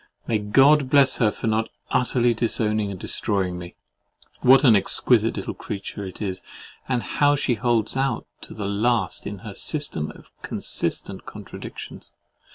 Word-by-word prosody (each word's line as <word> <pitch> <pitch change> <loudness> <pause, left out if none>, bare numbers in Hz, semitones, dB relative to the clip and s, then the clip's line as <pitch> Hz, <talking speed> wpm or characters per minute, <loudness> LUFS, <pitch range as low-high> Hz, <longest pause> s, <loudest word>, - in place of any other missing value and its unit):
May 110 -2 0
God 135 +7 +4
bless 140 -1 +5
her 115 - +3
for - - -6
not 110 0 0 0.2
utterly 120 -1 +2
disowning 110 -2 +1
and 95 -2 -6
destroying 90 -2 0
me! 85 0 -10 0.7
What 135 +2 +6
an 120 -6 +7
exquisite 100 - +2
little - - -4
creature 100 0 -6
it 95 +3 -7
is, 95 -2 -3 0.5
and 125 -2 0
how 145 0 +2
she 140 -3 0
holds 115 -1 0
out 135 +1 -1 0.2
to - - -10
the 105 - -4
last 110 +4 0
in 100 -2 -6
her 105 - -6
system 145 - -2
of - - -17
consistent - - -2
contradictions! - - -8
110 Hz, 155 wpm, -23 LUFS, 100-130 Hz, 0.7 s, an